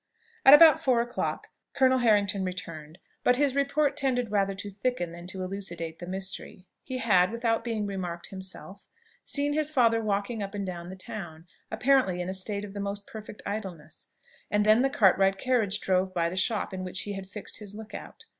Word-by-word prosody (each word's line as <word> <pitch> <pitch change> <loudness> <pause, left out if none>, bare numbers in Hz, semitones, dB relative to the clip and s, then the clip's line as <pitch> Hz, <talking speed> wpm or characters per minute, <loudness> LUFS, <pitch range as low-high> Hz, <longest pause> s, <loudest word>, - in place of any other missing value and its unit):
At 275 - +11
about 315 -1 +8
four 255 -3 +3
o'clock 240 +1 -2 0.3
Colonel 260 -1 +4
Harrington 205 -4 +3
returned; 165 -4 -6 0.3
but 250 - +4
his 280 -1 +2
report 280 +1 +1
tended 250 -5 0
rather 195 -1 +1
to 205 +1 -6
thicken 195 -3 -2
than 175 +1 -10
to 185 0 -4
elucidate 175 -4 -4
the 175 - -7
mystery. 190 0 -5 0.2
He 260 -1 -5
had, 190 -7 +4
without 230 -1 0
being 225 -3 -2
remarked 180 -4 -4
himself, 190 +1 -8 0.4
seen 290 0 0
his 305 0 +1
father 230 -6 +3
walking 210 +2 -1
up 200 +1 -5
and 200 -1 -3
down 175 -2 -6
the 190 - -7
town 170 -4 -8 0.2
apparently 255 -9 +2
in 180 +1 -3
a - - -2
state 200 +2 -3
of 195 - -10
the 205 - -6
most 200 0 -3
perfect 215 -1 -10
idleness; 185 -7 -6 0.4
and 210 0 +2
then 215 +3 +6
the 270 - +3
Cartwright 195 -4 +4
carriage 220 -4 +1
drove 185 0 0
by 170 -1 +1
the 180 - -6
shop 205 +1 0
in 185 0 -4
which 185 0 -3
he 205 - -5
had 195 -1 -7
fixed 205 +1 -4
his 205 -1 -9
look 220 0 -10
out. - - -9
200 Hz, 195 wpm, -28 LUFS, 185-235 Hz, 0.4 s, At